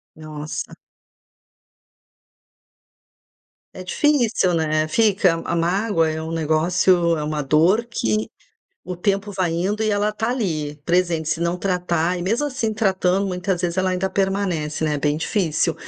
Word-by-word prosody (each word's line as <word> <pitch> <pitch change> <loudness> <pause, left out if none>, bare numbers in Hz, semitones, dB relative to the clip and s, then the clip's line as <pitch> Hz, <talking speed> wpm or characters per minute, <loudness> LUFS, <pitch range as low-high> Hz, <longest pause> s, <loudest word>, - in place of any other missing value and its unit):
Nossa. 155 -1 -6 3.0
É 185 - -8
difícil, 240 -5 +2
né. 155 -1 +1
Fica. 195 -3 +3
A - - -3
a - - +1
mágoa 170 0 +1
é 155 0 -3
um 160 +1 -5
negócio 170 +2 +2
é 150 - -3
uma 150 0 -2
dor 165 - +3
que 110 - -1 0.6
o 180 - -5
tempo 200 +2 -1
vai 185 -3 0
indo 195 +6 -1
e 215 - +1
ela 205 0 +1
tá 220 +2 -2
ali, 160 - -2
presente. 170 -2 +1
Se 165 - -1
não 170 +1 0
tratar, 180 -2 0
e - - -4
mesmo 225 +11 0
assim 255 -6 -2
tratando, 195 -2 +1
muitas 180 -1 -2
vezes 175 0 -2
ela 185 0 +2
ainda 185 +1 -1
permanece, 190 -7 -1
né. 155 -1 +1
É - - -2
bem 145 +1 0
difícil. 165 -1 0
180 Hz, 150 wpm, -21 LUFS, 160-200 Hz, 3.0 s, Fica